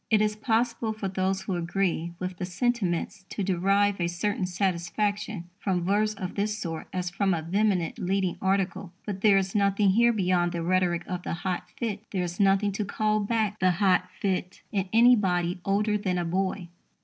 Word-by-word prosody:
It 215 - +4
is 210 0 +1
possible 225 0 0
for 215 -2 -4
those 190 0 -1
who 195 - -3
agree 175 -1 -1
with 185 0 -5
the 180 - -3
sentiments 195 -1 -1
to 205 - -3
derive 195 +1 +2
a 170 - +2
certain 185 +2 -1
satisfaction 195 +1 -1
from 180 -3 -1
verse 210 +2 +1
of 185 -2 -5
this 210 +1 -1
sort 165 -5 -5
as 180 -1 -3
from 190 0 +1
a 160 - -4
vehement 185 -1 0
leading 190 0 0
article. 190 -1 0
But 195 -2 -4
there 205 -2 +6
is 190 0 0
nothing 200 -1 +3
here 235 +4 +4
beyond 180 -4 +1
the 170 -1 -2
rhetoric 175 -1 +1
of 180 -1 -4
the - - -4
hot 185 -2 -2
fit. 215 -4 -3
There 185 -3 -1
is 175 0 -5
nothing 200 +1 +3
to 200 +2 -2
call 215 +1 0
back 215 0 0
the 185 -1 +3
hot 185 0 +2
fit 185 -2 -2
in 195 -3 -1
anybody 195 -7 +4
older 210 +2 +1
than 185 -3 -1
a 175 - -1
boy. 185 +1 -1
195 Hz, 185 wpm, -27 LUFS, 180-210 Hz, -, there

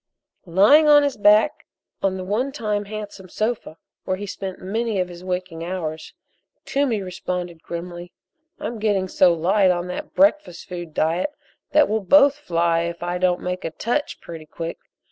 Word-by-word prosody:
Lying 210 - +6
on 295 -1 +7
his 285 -1 0
back 210 +1 +3 0.3
on 190 -1 0
the 185 - -5
one 220 +9 -1
time 210 -6 -2
handsome 205 -2 -8
sofa, 215 -5 -3 0.3
where 185 - -2
he 205 - -5
spent 190 -1 -6
many 220 +2 -2
of 180 -1 -1
his 175 0 -11
waking 180 -2 -4
hours, 165 -3 -5 0.5
Toomey 255 -8 0
responded, 180 -2 -5
grimly: 175 +1 -7 0.5
"I'm 235 -1 -5
getting 205 -3 +1
so 185 -1 +4
light 185 +4 +3
on 175 -1 0
that 180 - -6
breakfast 285 - +2
food 175 -3 -7
diet 165 - +1 0.4
that 300 -1 +6
we'll 220 +1 0
both 285 +7 +5
fly 170 - +1
if 170 0 -3
I 175 +1 -2
don't 180 -1 +1
make 180 0 -3
a - - -2
'touch' 240 - -2
pretty 160 -2 -9
quick. 165 +1 -6
185 Hz, 165 wpm, -22 LUFS, 175-215 Hz, 0.5 s, on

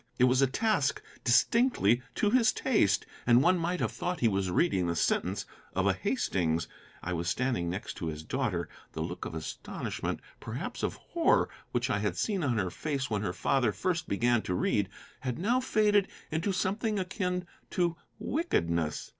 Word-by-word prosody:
It 125 - +3
was 130 +1 +5
a 135 - +5
task 170 - +1 0.2
distinctly 125 - +4
to 210 - +2
his 240 -2 +5
taste, 105 - +2 0.2
and 120 +2 +6
one 180 +2 +4
might 175 +2 -1
have - - 0
thought 180 -1 -3
he 120 - +4
was 95 -3 +1
reading 90 - +2
the 85 - 0
sentence - - 0 0.3
of - - +1
a - - +4
Hastings. 85 -2 0 0.4
I 90 - -2
was 85 0 -1
standing 120 -9 0
next 95 +4 -5
to 85 - -3
his 80 -1 -4
daughter. 105 - -1 0.3
The 80 - -4
look 90 +2 -5
of 80 - -5
astonishment, 80 -1 -4 0.2
perhaps - - -5
of - - -1
horror, - - +2 0.2
which 125 +1 0
I 105 - +1
had 105 0 -1
seen 200 -5 0
on 125 -5 +1
her 95 -4 0
face 140 - -3
when 105 -2 0
her 105 - -1
father 125 +4 +1
first 175 - -1
began 120 +3 +2
to 90 - -2
read 100 +1 +1 0.3
had 125 -2 -3
now 230 +8 +2
faded 210 -5 +3 0.2
into 165 +6 0
something 205 +3 0
akin 180 -1 -2 0.2
to 175 -2 +1 0.2
wickedness. 85 - -1
130 Hz, 180 wpm, -30 LUFS, -, 0.4 s, and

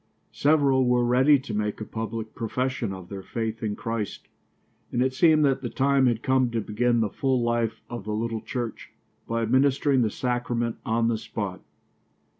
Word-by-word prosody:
Several 140 -3 +3
were 125 0 +3
ready 130 +4 +5
to 130 -4 -7
make 105 0 -2
a 110 - -5
public 110 0 -5
profession 125 -1 -2
of 95 -2 -8
their 100 -1 -6
faith 115 +2 -4
in 105 -2 -2
Christ, 115 -2 -4 0.6
and 120 - -1
it 130 +1 +2
seemed 155 +1 +4
that 135 -2 +1
the 120 - -3
time 135 0 +3
had 115 -1 0
come 130 -1 +2
to 115 -1 -1
begin 120 +2 +1
the 110 - +1
full 130 -3 0
life 120 -1 -1
of 120 -4 -7
the 105 0 -2
little 115 0 -2
church, 120 -4 -5 0.4
by 115 0 -1
administering 135 +3 +3
the 110 - +2
sacrament 120 0 -2
on 115 +1 +2
the 115 -2 0
spot. 100 -5 -5
120 Hz, 180 wpm, -26 LUFS, 110-130 Hz, 0.6 s, ready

